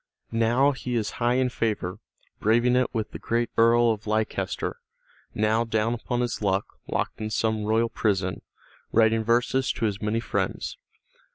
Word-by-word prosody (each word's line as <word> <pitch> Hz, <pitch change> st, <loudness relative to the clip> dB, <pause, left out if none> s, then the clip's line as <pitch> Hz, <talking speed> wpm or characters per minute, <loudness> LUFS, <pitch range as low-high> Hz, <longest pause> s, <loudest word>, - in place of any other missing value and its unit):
Now 120 Hz, +5 st, +3 dB
he 125 Hz, -2 st, -4 dB
is 110 Hz, -3 st, -1 dB
high 120 Hz, +1 st, +3 dB
in 130 Hz, 0 st, +2 dB
favor, 105 Hz, -7 st, -2 dB, 0.4 s
braving 120 Hz, +3 st, +3 dB
it 125 Hz, 0 st, +2 dB
with 110 Hz, -3 st, -3 dB
the -, -, -7 dB
great 120 Hz, 0 st, -1 dB
Earl 115 Hz, +1 st, +5 dB
of 110 Hz, -1 st, -5 dB
Leicester, 110 Hz, +1 st, -1 dB, 0.6 s
now 110 Hz, +2 st, +2 dB
down 110 Hz, 0 st, 0 dB
upon 120 Hz, +1 st, -2 dB
his 120 Hz, -2 st, -2 dB
luck, 100 Hz, -1 st, +1 dB, 0.2 s
locked -, -, -2 dB
in 110 Hz, -, -2 dB
some 110 Hz, -1 st, 0 dB
royal 110 Hz, +2 st, +2 dB
prison, 95 Hz, -5 st, -1 dB, 0.5 s
writing 110 Hz, 0 st, +4 dB
verses 125 Hz, +3 st, +2 dB
to 115 Hz, -, -2 dB
his 105 Hz, -2 st, -2 dB
many 105 Hz, +1 st, 0 dB
friends. 115 Hz, -, -2 dB
115 Hz, 160 wpm, -26 LUFS, 110-120 Hz, 0.6 s, Earl